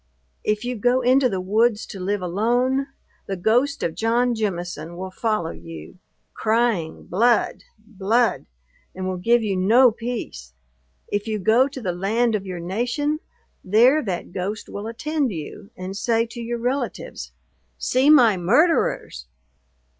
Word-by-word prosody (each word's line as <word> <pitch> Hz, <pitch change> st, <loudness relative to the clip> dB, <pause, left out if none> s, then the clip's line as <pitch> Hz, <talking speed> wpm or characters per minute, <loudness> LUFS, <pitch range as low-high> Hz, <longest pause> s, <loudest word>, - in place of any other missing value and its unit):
If 210 Hz, +2 st, -1 dB
you 250 Hz, 0 st, -2 dB
go 245 Hz, +4 st, +2 dB
into 255 Hz, +1 st, +4 dB
the 190 Hz, -4 st, -2 dB
woods 215 Hz, +4 st, +1 dB
to 195 Hz, -, -9 dB
live 195 Hz, +1 st, -2 dB
alone, 245 Hz, +9 st, +1 dB, 0.4 s
the 195 Hz, -, -2 dB
ghost 240 Hz, +9 st, +1 dB
of 165 Hz, -, -1 dB
John 240 Hz, +4 st, +1 dB
Jemison 175 Hz, -6 st, -4 dB
will 190 Hz, +1 st, -6 dB
follow 215 Hz, -4 st, -1 dB
you, 80 Hz, -, -11 dB, 0.3 s
crying, 220 Hz, -7 st, 0 dB
blood! 230 Hz, +5 st, +1 dB
blood! 220 Hz, +2 st, 0 dB, 0.5 s
and 185 Hz, 0 st, -4 dB
will 185 Hz, -1 st, -2 dB
give 235 Hz, +5 st, +3 dB
you 200 Hz, -3 st, -1 dB
no 230 Hz, +7 st, +5 dB
peace! 220 Hz, -, -6 dB, 0.6 s
If 205 Hz, +2 st, -2 dB
you 215 Hz, -1 st, -1 dB
go 225 Hz, +7 st, +3 dB
to 275 Hz, -1 st, -8 dB
the 190 Hz, -7 st, -2 dB
land 220 Hz, +6 st, +1 dB
of 200 Hz, -2 st, -2 dB
your 180 Hz, -2 st, -5 dB
nation, 245 Hz, -, -1 dB, 0.4 s
there 240 Hz, +10 st, +4 dB
that 185 Hz, -9 st, -4 dB
ghost 200 Hz, +4 st, -4 dB
will 205 Hz, +2 st, -6 dB
attend 285 Hz, +3 st, -1 dB
you, 170 Hz, +5 st, -8 dB
and 185 Hz, +1 st, -6 dB
say 230 Hz, +2 st, +1 dB
to 235 Hz, -, -7 dB
your 235 Hz, +1 st, -3 dB
relatives, 250 Hz, +4 st, -3 dB, 0.5 s
see 260 Hz, +3 st, +2 dB
my 240 Hz, -10 st, +6 dB
murderers! 195 Hz, -, +1 dB
220 Hz, 145 wpm, -23 LUFS, 185-245 Hz, 0.6 s, my